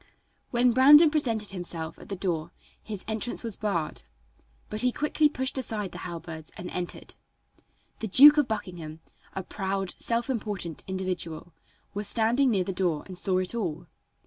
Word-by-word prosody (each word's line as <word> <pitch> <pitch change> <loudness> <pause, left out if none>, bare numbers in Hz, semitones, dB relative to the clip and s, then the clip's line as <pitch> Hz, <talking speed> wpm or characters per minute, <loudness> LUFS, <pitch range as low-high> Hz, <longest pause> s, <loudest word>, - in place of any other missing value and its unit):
When 245 0 +3
Brandon 295 +6 +8
presented 230 -10 0
himself 170 -3 -5
at - - -13
the 200 - -3
door 170 -4 -2 0.3
his 210 -4 -7
entrance 220 +3 -3
was 225 -4 -5
barred, 175 -7 -2 0.7
but 215 - -2
he 250 0 +3
quickly 300 +2 +2
pushed 260 -1 -1
aside 215 -6 -2
the - - -8
halberds 165 -2 -7
and 180 - -7
entered. 180 -1 -5 0.9
The 220 - -3
Duke 290 +9 +9
of 290 - +2
Buckingham, 175 -7 -5 0.3
a 190 - -3
proud, 195 0 -3
self 230 0 -1
important 205 - -3
individual, 180 -3 -3 0.4
was 205 0 -3
standing 235 +4 +3
near 195 -5 +2
the 190 - -4
door 175 -5 0
and 185 - -9
saw 185 +1 +1
it 185 +2 0
all. 175 -7 -3
195 Hz, 160 wpm, -27 LUFS, 175-235 Hz, 0.9 s, Duke